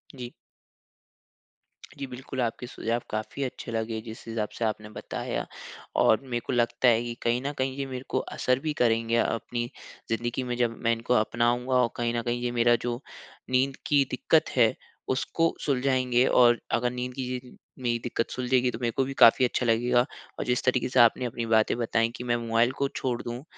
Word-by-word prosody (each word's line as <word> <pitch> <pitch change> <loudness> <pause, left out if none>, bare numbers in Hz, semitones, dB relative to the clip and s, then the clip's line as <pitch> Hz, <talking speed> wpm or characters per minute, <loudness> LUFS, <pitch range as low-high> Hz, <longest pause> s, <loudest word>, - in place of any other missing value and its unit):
जी। 125 -2 -7 1.7
जी 140 - -4
बिल्कुल 130 +1 -5
आपके 120 +1 -2
सुझाव 120 0 -2
काफ़ी 110 +6 -3
अच्छे 125 -2 -5
लगे 110 0 -2
जिस 110 0 -10
हिसाब 115 -2 -2
से 115 - 0
आपने 105 -1 -3
बताया। 105 - -4 0.6
और 110 - +5
मेरे 125 -3 -3
को - - -2
लगता 120 +1 +2
है 115 -1 +5
कि 120 -1 -4
कहीं 120 +1 +1
न 145 - 0
कहीं 130 0 -1
ये 140 - -2
मेरे 130 -1 -6
को - - 0 0.2
असर 130 0 +2
भी 155 +1 -2
करेंगे 115 0 +2
अपनी 120 +1 -1 0.4
ज़िंदगी 120 +3 -1
में 125 -1 -3
जब 120 -2 0
मैं 115 - +3
इनको 115 +2 -1
अपनाऊँगा 120 +3 +1
और 120 - +2
कहीं 120 0 0
न 120 - 0
कहीं 120 +1 -2
ये 120 - 0
मेरा 120 0 +4
जो 120 0 -2 0.5
नींद 130 +1 +2
की 145 -2 +4
दिक़्क़त 155 +5 +2
है 120 -1 +4 0.4
उसको 165 +5 0
सुलझाएँगे 130 -2 +2
और 120 -2 +5
अगर 120 +1 +1
नींद 125 0 -4
की 130 - -5
ये 125 - -2
जो 125 - -14 0.3
मेरी 120 -1 +1
दिक़्क़त 115 -1 -2
सुलझेगी 125 0 +1
तो 110 - -7
मेरे 120 -1 +1
को 135 - +4
भी 135 - -5
काफ़ी 125 +3 +8
अच्छा 125 - -1
लगेगा। 120 +2 +3 0.3
और - - -2
जिस 125 0 0
तरीके 130 0 +1
से 130 0 +2
आपने 120 +2 +5
अपनी 120 -1 -3
बातें 110 -1 +3
बताई 115 -1 +1
कि 125 - -6
मैं 120 -1 +1
मोबाइल 115 +1 +2
को 140 - +1
छोड़ 125 -2 -2
दूँ, 120 +3 -6
120 Hz, 200 wpm, -27 LUFS, 115-125 Hz, 1.7 s, काफ़ी